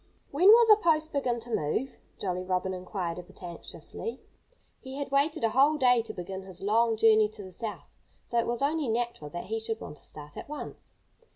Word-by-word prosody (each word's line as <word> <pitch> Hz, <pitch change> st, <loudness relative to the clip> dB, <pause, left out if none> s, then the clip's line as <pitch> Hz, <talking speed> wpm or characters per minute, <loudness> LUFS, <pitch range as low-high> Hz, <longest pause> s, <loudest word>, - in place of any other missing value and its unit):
"When 330 Hz, +7 st, +3 dB
will 465 Hz, +3 st, +9 dB
the 430 Hz, -1 st, +6 dB
post 315 Hz, -1 st, +2 dB
begin 250 Hz, -4 st, 0 dB
to 235 Hz, 0 st, -7 dB
move?" 225 Hz, -, -2 dB, 0.2 s
Jolly 180 Hz, -2 st, -2 dB
Robin 185 Hz, 0 st, -1 dB
inquired, 180 Hz, -2 st, -4 dB
a -, -, -5 dB
bit 185 Hz, +1 st, -17 dB
anxiously. 175 Hz, -, -7 dB, 0.6 s
He 265 Hz, 0 st, -9 dB
had 280 Hz, -1 st, -4 dB
waited 280 Hz, 0 st, +1 dB
a 225 Hz, -, +4 dB
whole 280 Hz, +6 st, +4 dB
day 250 Hz, -4 st, +4 dB
to 225 Hz, -1 st, -7 dB
begin 190 Hz, -1 st, -6 dB
his 190 Hz, -1 st, -11 dB
long 225 Hz, +2 st, +3 dB
journey 220 Hz, -1 st, +5 dB
to 215 Hz, -1 st, -9 dB
the 185 Hz, -, -10 dB
South, 185 Hz, -5 st, -6 dB, 0.3 s
so 235 Hz, -, 0 dB
it 230 Hz, -, 0 dB
was 240 Hz, +2 st, -1 dB
only 300 Hz, 0 st, +1 dB
natural 235 Hz, -9 st, -2 dB
that 175 Hz, +3 st, -5 dB
he 225 Hz, +2 st, -3 dB
should 225 Hz, 0 st, -4 dB
want 150 Hz, -, -8 dB
to 135 Hz, -, -17 dB
start 150 Hz, -1 st, -11 dB
at -, -, -8 dB
once. 300 Hz, -, -8 dB
225 Hz, 210 wpm, -29 LUFS, 185-275 Hz, 0.6 s, will